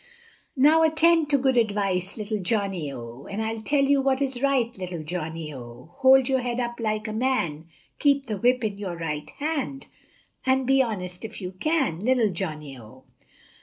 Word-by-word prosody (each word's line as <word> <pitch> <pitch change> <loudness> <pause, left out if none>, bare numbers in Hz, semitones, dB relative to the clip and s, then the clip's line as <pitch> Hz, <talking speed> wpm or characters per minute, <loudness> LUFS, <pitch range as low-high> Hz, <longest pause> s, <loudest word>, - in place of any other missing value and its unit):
Now 300 +5 +6
attend 320 0 +4
to 285 - +4
good 260 -1 +2
advice, 200 -4 0
Little 215 0 -3
Johnny, 190 -6 -1
O, 120 +1 -9
And 200 - -4
I'll 220 0 -2
tell 280 +5 +2
you 275 0 +3
what 265 -1 +1
is 265 -3 -2
right, 265 -4 +1
Little 180 -4 -5
Johnny, 160 -1 -5
O, 125 +3 -11
Hold 265 -1 +6
your 265 -1 +2
head 245 -1 -2
up 240 -1 -3
like 215 -1 -1
a 215 - -4
man, 215 - -1 0.3
Keep 280 -1 +3
the 215 -4 -3
whip 245 +4 +2
in 205 -2 -2
your 185 -4 -4
right 150 -3 -4
hand, 285 -2 -3 0.6
And 265 0 +2
be 270 +1 +4
honest, 180 -7 -3
if 225 0 -7
you 180 -2 -5
can, 265 - 0
Little 235 -1 +2
Johnny, 150 -5 -5
O. 120 +4 -15
220 Hz, 180 wpm, -25 LUFS, 175-265 Hz, 0.6 s, Now